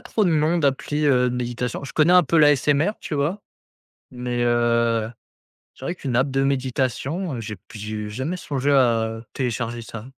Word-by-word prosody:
trop 215 - -1
de 180 - +2
noms 160 +2 +2
d'appli, 145 0 0
heu, 125 -3 +3
de 125 - -3
méditation. 125 +2 -3
Je - - -8
connais 160 +3 +4
un 180 -1 +7
peu 165 +3 0
l'ASMR, 145 +4 +4
tu - - -5
vois? 155 +8 -1 0.7
Mais, 125 -1 -3
heu, 115 -1 +2 0.6
c'est 135 - -11
vrai 175 - -2
qu'une 135 -8 -4
app 130 +3 +2
de 135 0 +1
méditation, 135 +4 -1
heu, 115 - -5
j'ai 110 -1 -6
p 90 - -26 0.2
j'ai 105 0 -5
jamais 135 +12 -3
songé 145 -3 -1
à 115 -4 +2
télécharger 120 -2 -3
ça. 115 -1 -9
130 Hz, 180 wpm, -23 LUFS, 120-150 Hz, 0.7 s, un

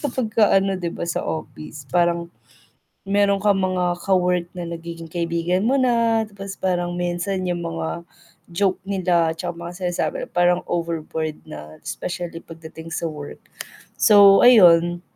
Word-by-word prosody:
kapag 255 -5 -2
ka 215 -2 +4
ano 195 0 +2
'di 170 -2 -4
ba - - -4
sa 170 - -1
office 155 -2 -7
parang 170 -1 +1 0.8
meron 200 0 +2
kang 200 -2 +3
mga 180 -1 0
ka-work 180 -2 +2
na 175 -2 -5
nagiging 165 -1 -8
kaibigan 170 +3 -1
mo 270 - +2
na 230 -3 +2
tapos 195 -1 -8
parang 175 -1 -1
minsan 175 +2 -2
yung 175 -1 -2
mga 165 +1 -4 0.5
joke 190 +1 0
nila 175 -4 +1
tsaka 175 +1 -5
mga 170 +1 -7
sinasabi 175 -1 -1
nila - - -23
parang 175 0 +3
overboard 160 -2 -3
na, 75 +1 -10
specially 175 -1 -5
pagdating 160 0 -11
sa - - -3
work. 145 -1 -9 0.6
So 200 -2 +7
ayun, 175 -6 +6
175 Hz, 145 wpm, -22 LUFS, 170-195 Hz, 0.8 s, So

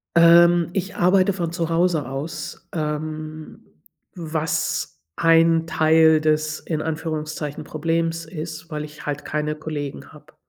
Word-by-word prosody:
Ähm, 170 0 +6
ich 195 0 -3
arbeite 185 +2 +3
von 170 -3 -3
zu 170 -1 -2
Hause 165 -5 +1
aus, 150 +4 -6
ähm, 155 0 -5 0.5
was 160 -3 -2 0.2
ein 165 0 +4
Teil 160 0 +4
des, 155 0 0
in 155 -2 -3
Anführungszeichen, 155 -2 -4
Problems 165 +1 -2
ist, 160 -1 -7
weil 150 -1 -4
ich 150 0 -11
halt 145 -1 -4
keine 150 0 -2
Kollegen 150 -2 -6
habe. - - -17
160 Hz, 125 wpm, -22 LUFS, 155-165 Hz, 0.5 s, Ähm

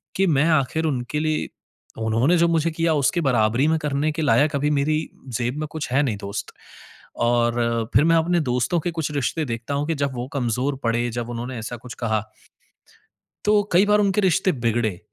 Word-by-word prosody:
कि 195 0 +2
मैं 150 -3 +3
आखिर 155 +1 +1
उनके 135 -1 -2
लिए 155 0 -1 0.6
उन्होंने 115 +10 +2
जो 170 0 +4
मुझे 165 0 +1
किया 165 0 +1
उसकी 150 +4 +1
बराबरी 125 -1 +2
में 160 0 +2
करने 150 +1 -1
के 155 - -4
लायक 145 0 +3
अभी 145 +1 +1
मेरी 150 +2 +1 0.4
ज़ेब 120 +3 -2
में 155 - -3
कुछ 155 -5 -5
है 135 +3 +3
नहीं 115 -7 -1
दोस्त। 100 +1 -5 0.7
और 120 -1 +1
फिर 130 - +6
मैं 165 0 +4
अपने 170 +2 +2
दोस्तों 125 +5 0
के 175 - -2
कुछ 160 -2 -3
रिश्ते 150 +2 -1
देखता 115 +2 -4
हूँ 145 +1 -1
कि 165 - 0
जब 140 -2 -1
वो 120 +1 -4
कमज़ोर 130 +1 -1
पड़े, 120 +1 0
जब 120 0 -4
उन्होंने 120 +2 -5
ऐसा 115 +2 -5
कुछ 120 +1 -10
कहा, 110 -2 0 1.3
तो 210 0 +4
कई 185 +4 +6
बार 210 0 +4
उनके 205 0 +2
रिश्ते 190 0 +2
बिगड़े, 115 - -1
140 Hz, 195 wpm, -23 LUFS, 120-160 Hz, 1.3 s, फिर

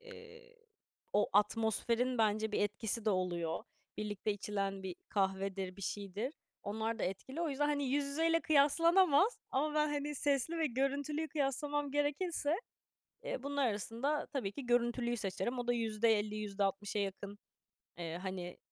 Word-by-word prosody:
eee, 470 0 -13 0.6
o 205 - +3
atmosferin 225 +4 +2
bence 215 0 +2
bir - - +1
etkisi 210 +2 -1
de 215 - +3
oluyor. 180 0 -1 0.3
Birlikte 210 0 -1
içilen 195 -1 -2
bir 185 -2 -5
kahvedir, 195 -1 -1
bir 200 - -9
şeydir. 205 - -3 0.3
Onlar 220 +2 -2
da - - -3
etkili. 230 - -4
O 335 - +1
yüzden, 290 +1 +1
hani, 290 -1 +1
yüz 280 +2 +1
yüzeyle 330 +3 +2
kıyaslanamaz 330 - +5
ama 300 +3 +1
ben, 300 0 +3
hani, 295 0 -2
sesli 285 +4 +1
ve 320 - +3
görüntülüyü 285 +4 -1
kıyaslamam 290 0 -1
gerekirse, 290 +2 0 0.7
eee, 250 - -3
bunlar 280 -1 +1
arasında 230 +8 -1
tabii 245 -9 -3
ki 265 +1 -7
görüntülüyü 240 0 +2
seçerim. 200 +4 -2
O 245 - -2
da 245 - +3
%50 220 -2 +2
%60 200 0 -1
yakın, 200 +1 -3 0.6
eee, 170 -1 -4
hani, 185 -2 -5
235 Hz, 145 wpm, -35 LUFS, 205-290 Hz, 0.7 s, kıyaslanamaz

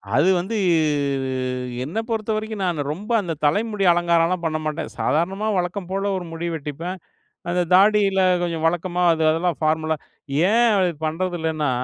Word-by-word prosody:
அது 145 +7 +4
வந்து, 215 +5 -3 1.3
என்ன 165 +9 -6
பொறுத்தவரைக்கும் 220 -1 -2
நானு 170 -5 -1
ரொம்ப 205 +9 -6
அந்த 170 -3 -3
தலைமுடி 205 +4 +1
அலங்காரம்லாம் 170 0 +2
பண்ண 155 -1 0
மாட்டேன். 155 +1 -3
சாதாரணமா 190 +7 0
வழக்கம் 180 +1 -3
போல 195 +1 -1
ஒரு 180 - -6
முடி 165 +1 -4
வெட்டிப்பேன். 160 +5 -5 0.5
அந்த 180 +1 +1
தாடில 195 0 +4 0.2
கொஞ்சம் 165 -2 -2
வழக்கமா 175 +1 -1
அது 160 -1 0
அதெல்லாம் 165 +1 0
பார்மலா 155 0 +1 0.5
ஏன் 235 +2 +4
அது 180 -2 +2
பண்றது 175 +3 -2
இல்லன்னா, 155 -2 -1
175 Hz, 140 wpm, -22 LUFS, 160-195 Hz, 1.3 s, அது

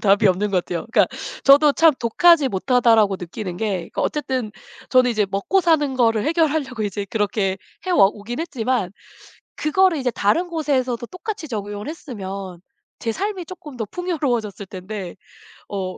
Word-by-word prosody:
답이 200 +1 +4
없는 195 +3 +1
것 180 -2 +1
같아요. 170 +1 -4
그러니까 - - +5 0.4
저도 285 +2 +7
참 325 +2 +5
'독하지 300 +5 +4
못하다.'라고 225 -2 +3
느끼는 180 +1 -6
게 190 -4 -3
그 - - -3
어쨌든 260 -7 -2 0.4
저는 255 -1 +5
이제 215 -3 +1
먹고사는 295 - +2
거를 225 -3 +2
해결하려고 305 -7 0
이제 205 0 -3
그렇게 200 -3 0 0.3
해 - - -1
와 340 - +6
오긴 210 +5 -6
했지만 250 - -1 0.6
그거를 330 +2 +2
이제 255 -2 0
다른 280 - +1
곳에서도 265 -8 -1
똑같이 370 - -6
적용을 205 0 -5
했으면 195 - -7 0.4
제 230 - -1
삶이 385 - -3
쪼끔 315 -6 -10
더 230 - -2
풍요로워졌을 245 - -2
텐데 185 -1 -7 0.5
어 190 -2 -4
235 Hz, 350 characters per minute, -21 LUFS, 200-305 Hz, 0.6 s, 저도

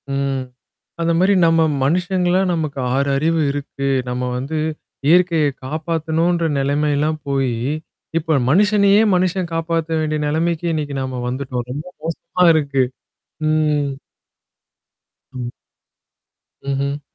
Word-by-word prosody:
ம். 135 -1 -1 0.6
அந்த 165 0 +2
மாரி 190 +3 +4
நம்ம 165 0 +4 0.2
மனுஷங்களா 180 +4 +1
நமக்கு 155 -4 -2
6 140 +1 +1
அறிவு 160 +3 +1
இருக்கு. 140 -1 -4 0.2
நம்ம 125 0 -2
வந்து 140 +5 -3 0.5
இயற்கைய 170 -1 +4 0.2
காப்பாத்தணுன்ற 160 +3 0
நிலைமைல்லாம் 145 +2 +1
போயி 135 -3 0 0.6
இப்ப 160 -2 +1
மனுஷனையே 205 +4 +5
மனுஷன் 180 -1 0
காப்பாத்த 165 0 -1
வேண்டிய 155 -1 -1
நிலைமைக்கு 165 +2 0
இன்னைக்கு 145 -3 -3
நாம 130 -1 -4
வந்துட்டோம். 125 -1 -3
ரொம்ப 145 +4 -5 0.2
மோசமா 165 +2 -1
இருக்கு. 140 -4 +1 0.7
ம். 150 -2 +1 1.4
ம். 125 -2 -5 1.2
ம்ஹ்ம். 140 +1 -1
155 Hz, 105 wpm, -20 LUFS, 140-165 Hz, 1.4 s, மனுஷனையே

